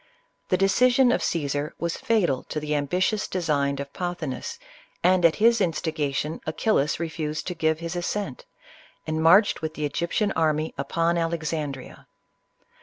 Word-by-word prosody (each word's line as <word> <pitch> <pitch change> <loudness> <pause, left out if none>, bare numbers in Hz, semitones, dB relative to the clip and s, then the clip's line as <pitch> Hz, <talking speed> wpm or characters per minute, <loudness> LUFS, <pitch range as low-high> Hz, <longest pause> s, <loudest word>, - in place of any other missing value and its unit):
The 185 - +3
decision 245 +7 +4
of - - +1
Caesar 145 -1 -2
was 170 0 -2
fatal 175 - +1
to 155 - -4
the 150 0 -3
ambitious 180 +8 0
designs 145 -6 0
of 140 0 -6
Pothi 175 -4 -3
nus, 465 - -5 0.5
and 185 0 +4
at 165 -1 +5
his 230 +2 +4
instigation, 155 -3 -1
Achillas 155 -3 +1
refused 155 -2 -3
to 180 - -3
give 160 -1 0
his 170 +1 -4
assent, 205 - -3 0.6
and 155 0 -2
marched 185 +5 +5
with 155 0 -4
the 150 - -2
Egyptian 170 +8 -1
army 155 -2 0
upon 165 +4 0
Alexandria. 160 -5 -4
165 Hz, 145 wpm, -25 LUFS, 150-185 Hz, 0.6 s, at